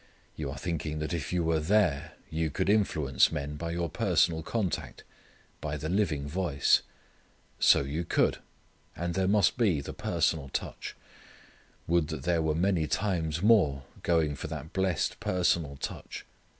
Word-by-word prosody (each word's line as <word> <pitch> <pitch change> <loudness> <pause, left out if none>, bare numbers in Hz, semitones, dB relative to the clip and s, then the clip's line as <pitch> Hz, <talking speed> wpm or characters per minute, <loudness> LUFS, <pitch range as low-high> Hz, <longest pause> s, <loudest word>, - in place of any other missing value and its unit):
You 75 -3 -4
are 70 - -6
thinking 80 -1 -3
that 75 +2 -3
if 85 - -3
you 90 -1 +1
were 80 -1 +2
there 85 -4 +1 0.2
you 80 0 0
could 75 - -1
influence 75 -11 +3
men 75 -1 -3
by 85 +3 -4
your 85 0 -1
personal 85 -3 +2
contact, 95 +1 -3 0.6
by 75 0 -3
the 75 +2 -4
living 80 -7 0
voice. 80 -3 +2 0.8
So - - +6
you 75 +5 -3
could. - - +1 0.6
And 85 0 -2
there 95 +1 +1
must 105 +4 +3
be 100 -10 +3
the 70 - -6
personal 70 -4 0
touch. - - -5 0.9
Would 85 -2 +2
that 80 -4 -5
there 85 0 +2
were 80 -1 0
many 85 -2 +1
times 80 -2 -1
more 90 -12 +4 0.2
going 80 -3 +2
for 70 - -6
that 75 -1 -7
blessed 95 -3 0
personal 85 -5 0
touch. - - -6
80 Hz, 155 wpm, -29 LUFS, 75-90 Hz, 0.9 s, So